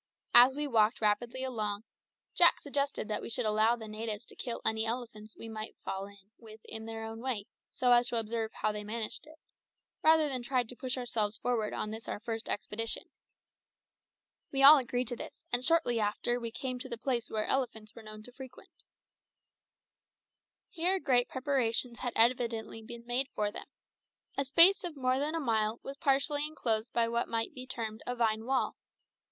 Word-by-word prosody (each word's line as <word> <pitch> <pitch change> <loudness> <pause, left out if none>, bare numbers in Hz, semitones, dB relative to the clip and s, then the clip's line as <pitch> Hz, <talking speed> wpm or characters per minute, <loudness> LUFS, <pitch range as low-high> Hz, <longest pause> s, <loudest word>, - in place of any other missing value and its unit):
As 250 +2 +8
we 295 +1 -1
walked 225 -4 +3
rapidly 235 +4 0
along, 215 -5 -3 0.5
Jack - - +5
suggested 280 -4 -2
that 210 - -2
we - - -6
should 235 +1 -1
allow 215 +2 +3
the 220 -2 -9
natives 215 +1 -5
to - - -16
kill 240 -2 -4
any 220 0 +2
elephants 225 -2 -5
we 225 - -8
might 220 -1 -6
fall 195 +1 -3
in 200 0 -18
with 220 -1 -13
in 220 0 -7
their 225 0 -6
own 225 0 -6
way, 235 -5 -2 0.3
so 250 -1 +1
as 240 0 +5
to 240 - -1
observe 225 0 -3
how 215 - -1
they 210 0 -5
managed 220 +5 -4
it, 315 +1 -15 0.6
rather 315 -1 +5
than 260 -3 -2
try 250 +1 +1
to 240 +2 -11
push 255 +1 -3
ourselves 220 -4 0
forward 230 -4 -1
on 215 - -3
this 225 +1 -7
our - - -4
first 225 +1 -5
expedition. 225 +2 -3 1.4
We 275 0 +1
all 290 +2 +11
agreed 250 -1 -2
to 245 - -3
this, - - -9
and 245 +1 +3
shortly 305 -6 +3
after 220 +3 0
we 235 -1 -3
came 255 +1 -5
to 260 - -7
the 235 - -4
place 245 -1 -2
which 215 -1 -1
elephants 225 -5 -2
were 230 - -11
known 215 0 -11
to 250 - -11
frequent. 255 0 -12 2.0
Here 365 +3 0
great 245 -7 +3
preparations 250 -3 -1
had 245 -2 -2
evidently 230 -1 +1
been 235 +1 -10
made 245 +3 +1
for 210 -1 0
them. - - -8 0.7
A 275 - 0
space 335 +10 +7
of 340 -5 -5
more 255 0 +1
than 300 +3 -1
a - - 0
mile 225 -4 0
was 275 - -6
partially 285 +1 +1
enclosed 230 -7 0
by 235 -1 +2
what 235 +1 0
might 225 +4 -1
be 255 -2 -8
termed 225 -3 -5
a 245 - -1
vine 220 -2 0
wall. 265 +1 0
235 Hz, 190 wpm, -31 LUFS, 220-260 Hz, 2.0 s, all